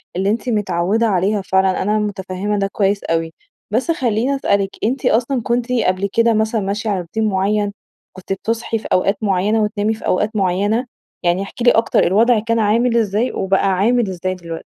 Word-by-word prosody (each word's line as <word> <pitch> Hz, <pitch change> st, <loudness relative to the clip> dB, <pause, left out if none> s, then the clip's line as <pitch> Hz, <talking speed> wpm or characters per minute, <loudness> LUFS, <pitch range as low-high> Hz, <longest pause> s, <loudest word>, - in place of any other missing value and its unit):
اللي 190 Hz, +2 st, 0 dB
أنتِ 230 Hz, +4 st, -1 dB
متعودة 210 Hz, 0 st, +1 dB
عليها 200 Hz, +1 st, +1 dB
فعلًا، 190 Hz, 0 st, +1 dB
أنا 210 Hz, +2 st, +1 dB
متفهمة 200 Hz, 0 st, -3 dB
ده 195 Hz, -, +1 dB
كويّس 200 Hz, 0 st, 0 dB
أوي. 165 Hz, 0 st, -1 dB, 0.4 s
بس 250 Hz, +10 st, +1 dB
خلّيني 255 Hz, -3 st, 0 dB
أسألِك، 200 Hz, -7 st, +1 dB
أنتِ 250 Hz, +4 st, -1 dB
أصلًا 245 Hz, +3 st, +1 dB
كنتِ 240 Hz, +1 st, -1 dB
قبل 200 Hz, -5 st, +1 dB
كده 230 Hz, 0 st, +3 dB
مثلًا 220 Hz, 0 st, 0 dB
ماشية 205 Hz, +3 st, -2 dB
على 200 Hz, -2 st, 0 dB
روتين 200 Hz, +6 st, -3 dB
معين، 200 Hz, +1 st, 0 dB, 0.4 s
كنتِ 185 Hz, +1 st, -5 dB
بتصحي 225 Hz, +3 st, -2 dB
في -, -, -8 dB
أوقات 195 Hz, +2 st, +2 dB
معيّنة 205 Hz, +2 st, +1 dB
وتنامي 210 Hz, +1 st, 0 dB
في 220 Hz, -, -9 dB
أوقات 210 Hz, +4 st, 0 dB
معيّنة؟ 205 Hz, +5 st, +1 dB, 0.4 s
يعني 175 Hz, +2 st, +1 dB
احكي 215 Hz, +4 st, -7 dB
لي 240 Hz, -, +6 dB
أكتر 225 Hz, 0 st, +2 dB
الوضع 225 Hz, +5 st, +3 dB
كان 230 Hz, +1 st, 0 dB
عامل 230 Hz, +3 st, +2 dB
إزاي، 220 Hz, +2 st, 0 dB
وبقى 195 Hz, 0 st, +1 dB
عامل 220 Hz, +3 st, +2 dB
إزاي 185 Hz, 0 st, -3 dB
دلوقتي؟ 170 Hz, -2 st, -8 dB
210 Hz, 180 wpm, -18 LUFS, 190-230 Hz, 0.4 s, لي